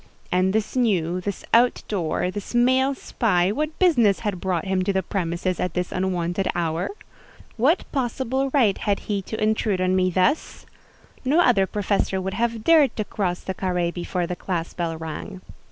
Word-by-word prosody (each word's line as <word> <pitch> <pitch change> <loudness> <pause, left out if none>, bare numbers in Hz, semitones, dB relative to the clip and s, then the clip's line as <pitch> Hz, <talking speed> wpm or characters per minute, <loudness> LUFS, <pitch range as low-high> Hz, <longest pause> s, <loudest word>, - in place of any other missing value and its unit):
And 185 +1 +2
this 215 +4 -1
new, 185 -8 +1
this 200 +1 -5
out 240 +2 +4
door, 180 -2 -1
this 205 +4 -6
male 260 +3 +3
spy, 190 -8 +1
what 305 +7 -2
business 240 - +3
had 205 -5 -3
brought 185 -3 -1
him 190 -1 0
to 200 - +1
the 190 -1 0
premises 180 -1 -2
at 180 -2 -2
this 180 0 -2
unwonted 185 0 -1
hour? 170 0 -1 0.7
What 280 +10 +2
possible 265 0 -1
right 235 -9 +3
had 200 -2 0
he 205 -2 -2
to 220 +3 -6
intrude 215 -2 +1
on 185 0 +2
me 185 0 +2
thus? 185 - 0 0.6
No 280 +6 +3
other 230 - +4
professor 200 -1 0
would 190 +1 -3
have 230 -1 -1
dared 315 -3 +5
to 215 - -2
cross 185 -5 -2
the 190 - -4
carré 180 -2 -1
before 175 0 -2
the 180 - -4
class 175 -2 -3
bell 165 -2 -3
rang. 165 +4 -6
195 Hz, 175 wpm, -23 LUFS, 180-230 Hz, 0.7 s, dared